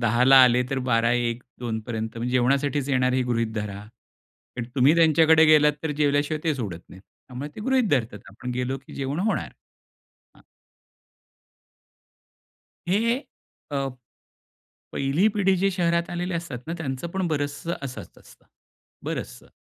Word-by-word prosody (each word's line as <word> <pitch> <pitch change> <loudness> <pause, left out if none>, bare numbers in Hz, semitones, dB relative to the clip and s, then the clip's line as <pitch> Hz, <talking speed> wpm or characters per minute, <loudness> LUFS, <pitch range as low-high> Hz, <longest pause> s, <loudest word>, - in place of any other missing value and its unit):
10 120 +1 +2
ला 135 +1 +7
आले 125 0 +3
तर 135 - 0
12 115 0 +3
1-2पर्यंत 120 -1 -3
पर्यंत 110 -1 -4
म्हणजे 120 +2 -3
जेवणासाठीच 135 +2 +1
येनार 130 -2 +2
हे 130 0 +1
गृहीत 115 -2 -1
धरा. 105 -2 -4 0.8
पण 120 - -3
तुम्ही 140 +3 +5
त्यांच्याकडे 160 0 +5
गेलात 150 -1 +6
तर 160 - -2
जेवल्याशिवाय 145 +1 +1
ते 160 -2 +1
सोडत 100 -11 -5
नाहीत. 95 - -14
त्यामुळे 130 +6 -10
ते - - -7
गृहीत 260 0 +1
धरतात, 115 -7 0
आपण 125 +5 -7
गेलो 125 +2 -2
की - - -11
जेवण 140 +2 -3
होणार, 220 +2 -1 0.9
हां. - - -21 2.4
हे 225 +7 +1 0.5
अ, 135 -1 -1 1.0
पहिली 140 +8 +1
पिढी 195 -2 +3
जे 195 +2 +1
शहरात 170 -2 0
आलेले 175 +1 -3
असतात 165 -7 -4
ना 165 - -4
त्यांचं 135 0 -4
पण 190 0 -2
बरचसं 145 +2 -2
असंच 135 -2 -8
असतं, - - -20 0.6
बरचसं. - - -6
140 Hz, 145 wpm, -24 LUFS, 125-165 Hz, 2.4 s, ला